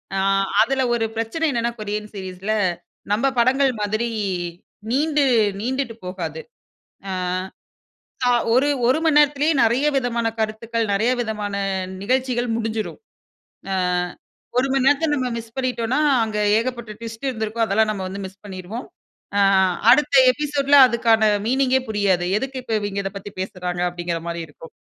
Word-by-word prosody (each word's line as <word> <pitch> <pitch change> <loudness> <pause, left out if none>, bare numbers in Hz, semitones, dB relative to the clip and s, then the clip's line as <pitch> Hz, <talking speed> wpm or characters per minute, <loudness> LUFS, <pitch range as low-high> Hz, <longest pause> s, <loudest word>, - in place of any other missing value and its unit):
அ - - 0
அ 195 0 +2 0.2
அதில 270 0 +2
ஒரு 230 -1 +1
பிரச்சனை 230 +9 -2
என்னென்னா, 235 -2 0
கொரியன் 210 0 -4
சீரிஸில, 190 +2 -4 0.6
நம்ப 260 +6 +2
படங்கள் 265 +2 +3
மாதிரி 215 +3 -1 0.8
நீண்டு 295 +2 +2 0.4
நீண்டுட்டு 255 0 -2
போகாது. 165 -4 -5 0.7
அ - - -3 1.1
க - - +2 0.3
ஒரு 270 +4 +3 0.2
1 260 - +3
மணி 315 -2 +3
நேரத்திலயே, 295 +1 +3
நெறைய 240 +6 +2
விதமான 235 -3 0
கருத்துக்கள், 225 +1 -2
நெறைய 215 +5 +2
விதமான 210 -3 -4 0.5
நிகழ்ச்சிகள் 250 +1 0
முடிஞ்சிரும். 225 -1 -3 0.7
அ - - +1 0.8
1 255 +2 +3
மணி 270 -1 +2
நேரத்த 290 +3 +3
நம்ம 255 -2 -1
மிஸ் 225 0 -9
பண்ணீட்டோன்னா, 255 0 -1 0.2
அங்க 215 -1 -3 0.2
ஏகப்பட்ட 235 -2 -4
ட்விஸ்ட் 230 +3 -6
இருந்துருக்கும். 225 -1 -1
அதெல்லாம் 215 +1 +2
நம்ம 200 -3 -4
வந்து 195 +1 -6
மிஸ் 195 +1 -18
பண்ணிருவோம். 195 +5 -7 0.5
அ - - +4 0.5
அடுத்த 280 +2 +4 0.2
எபிசோட்ல 285 0 +1
அதுக்கான 230 -2 +2 0.3
மீனிங்கே 260 +1 +2
புரியாது. 200 -4 +1
"எதுக்கு 265 +2 -5
இப்போ 230 - -4
இவைங்க 205 -1 -3
இத 195 - -2
பத்தி 200 +1 -8
பேசுறாங்க?" 180 -2 -4
அப்படீங்கிற 175 -1 -3
மாரி 170 0 -3
இருக்கும். 160 +2 -13
230 Hz, 140 wpm, -22 LUFS, 205-260 Hz, 1.1 s, அ